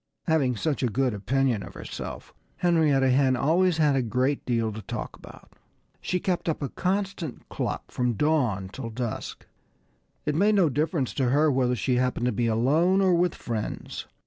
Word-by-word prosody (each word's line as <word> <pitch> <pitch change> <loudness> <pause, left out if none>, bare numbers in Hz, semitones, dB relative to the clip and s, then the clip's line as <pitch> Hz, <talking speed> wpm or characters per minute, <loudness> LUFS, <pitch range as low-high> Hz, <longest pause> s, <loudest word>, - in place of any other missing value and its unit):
Having 145 -6 +2
such 145 +6 -1
a 130 - +2
good 125 +2 0
opinion 120 +3 0
of - - -10
herself, - - -7 0.2
Henrietta 150 -7 +3
Hen 130 0 +3
always 165 +7 +2
had 150 -3 +3
a 135 - +2
great 125 +4 0
deal 115 -3 +1
to 110 - -7
talk - - -6
about. - - -15 0.5
She 180 - -1
kept 180 -2 -1
up 155 - -2
a 140 - -2
constant 190 -6 -3
cluck - - -4
from 125 -1 0
dawn 120 -8 +1
till 115 +3 -6
dusk. 115 0 -5 0.8
It 150 - 0
made 205 +7 +3
no 185 -6 +4
difference 150 -1 -1
to 130 -3 +1
her 150 +4 +3
whether 125 -2 +1
she 125 +1 0
happened 125 -1 0
to 125 - +2
be 120 -1 0
alone, 150 - +3
or 190 -2 +4
with 175 0 +2
friends. 110 -3 -5
135 Hz, 175 wpm, -26 LUFS, 125-160 Hz, 0.8 s, no